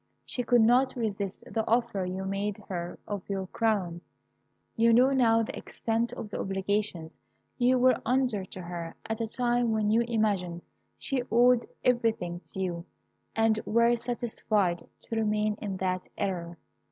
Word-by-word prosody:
She 250 - -2
could 245 0 +4
not 250 +3 +4
resist 200 -5 -3
the 225 - -2
offer 230 -5 +1
you 185 +1 -4
made 195 +1 -2
her 175 -2 -4
of 205 -2 -3
your 195 -1 -2
crown. 185 -5 -1 0.7
You 230 0 +4
now 255 +4 +6
know 230 -4 +4
the - - -5
extent 230 +1 -2
of 210 - -7
the - - -4
obligations 195 -3 -2 0.4
you 250 +1 +4
were 255 +1 +4
under 250 -5 +1
to 185 - -9
her 170 -1 -6
at 220 +1 -3
a 225 - -1
time 240 -2 +1
when 215 -1 +1
you 225 +2 +4
imagined 200 -7 0 0.3
she 270 -2 -2
owed 240 +1 +5 0.2
everything 225 -8 +1
to - - -9
you, 175 -2 -2 0.5
and 225 -1 +3
were 235 +1 +3
satisfied 220 -7 -1 0.2
to 225 - -5
remain 215 -1 +1
in 195 -3 -3
that 185 -1 -2
error. 175 -3 -3
215 Hz, 155 wpm, -29 LUFS, 190-235 Hz, 0.7 s, now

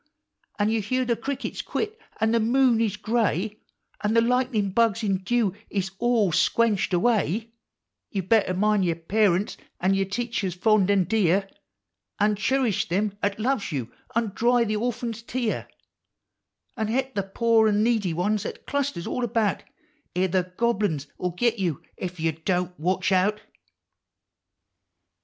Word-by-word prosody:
An' 205 0 +2
you 225 -1 +1
hear 255 +5 0
the 240 -1 +1
crickets 265 +4 -4
quit, 435 0 -3 0.2
an' 220 0 +2
the 230 - +3
moon 240 +1 +3
is 220 -4 0
gray, 215 -2 -1 0.4
An' 210 +2 +1
the 230 - +6
lightnin' 240 -4 +1
bugs 230 +1 +2
in 195 -2 +1
dew 210 0 +1 0.2
is 190 -2 -2
all 235 -6 +2
squenched 215 +5 +2
away, 215 +2 +1 0.3
— - - -60
You 195 -4 -2
better 195 -1 +2
mind 210 +1 +2
yer 170 -2 +1
parents, 190 +3 +1 0.2
and 190 +2 +2
yer 195 0 +1
teachers 205 -3 -2
fond 205 0 +3
and 195 -4 +3
dear, 195 -2 +2 0.7
An' 210 0 +3
churish 220 -2 +1
them 200 +3 0
'at 200 +1 -1
loves 230 -4 0
you, 130 -6 -4 0.2
an' 230 -3 +1
dry 240 +2 +3
the 215 -1 -1
or 240 +4 0
phant's 230 -1 -5
tear, 235 -1 -2 1.1
An' 220 -3 -1
he'p 265 +4 -1
the 200 - 0
pore 220 +3 +2
an' 210 0 +2
needy 220 -6 +1
ones 195 +5 0
'at - - -7
clusters 280 -11 -2
all 250 - -2
about, 225 -4 0 0.5
I> 185 +1 +2
the 185 0 0
Gobble 235 -3 +2
uns 145 -5 -4
'11 180 -1 -2
git 235 +2 +1
you 170 -7 -1 0.2
Ef 180 -1 -5
you 160 0 +1
Don't 180 +2 -2
Watch 185 +4 0
Out! 195 +3 +2
210 Hz, 160 wpm, -25 LUFS, 190-230 Hz, 1.1 s, the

